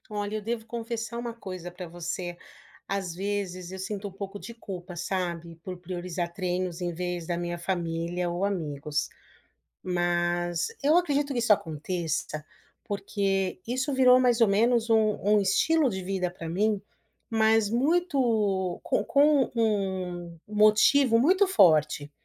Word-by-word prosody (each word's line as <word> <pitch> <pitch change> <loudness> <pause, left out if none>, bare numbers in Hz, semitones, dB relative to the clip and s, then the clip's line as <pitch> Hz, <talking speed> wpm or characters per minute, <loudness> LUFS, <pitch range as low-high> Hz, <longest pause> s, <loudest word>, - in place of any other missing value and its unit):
Olha 205 0 -3
eu - - -5
devo 225 +1 -3
confessar 230 0 -4
uma 235 -1 -4
coisa 185 -6 -7
pra 180 0 -8
você. 175 +1 -5 0.5
Às 190 -3 -3
vezes, 185 -2 -3
eu 190 - -7
sinto 200 +1 -4
um - - -8
pouco 195 +1 -7
de 210 +7 -9
culpa, 185 -5 -8
sabe, 170 -1 -3
por 185 -1 -6
priorizar 175 -1 -4
treinos 180 -1 -2
em 175 -1 -2
vez 175 0 -3
da 175 - -1
minha 175 0 -3
família 170 0 -2
ou 175 +2 -2
amigos. 150 -7 -2 0.7
Mas 175 -1 0
eu 300 +4 +4
acredito 290 -5 +1
que 250 - -2
isso 225 -2 +4
aconteça, 160 -3 -2 0.4
porque, 195 -1 -1
isso 260 +4 -1
virou 255 -1 +6
mais 245 -2 +3
ou 225 - +6
menos 230 +3 +2
um 220 -2 +3
um 210 +1 +4
estilo 280 +10 +3
de 190 -5 -4
vida 185 -1 -1
pra 170 -2 -8
mim, 205 +4 0 0.5
mas 220 -1 +3
muito 235 - +1
com - - 0
com 285 -2 +4
um 185 -6 -1
motivo 215 +4 +5
muito 370 - +4
forte. 155 - +4
195 Hz, 145 wpm, -27 LUFS, 175-225 Hz, 0.7 s, virou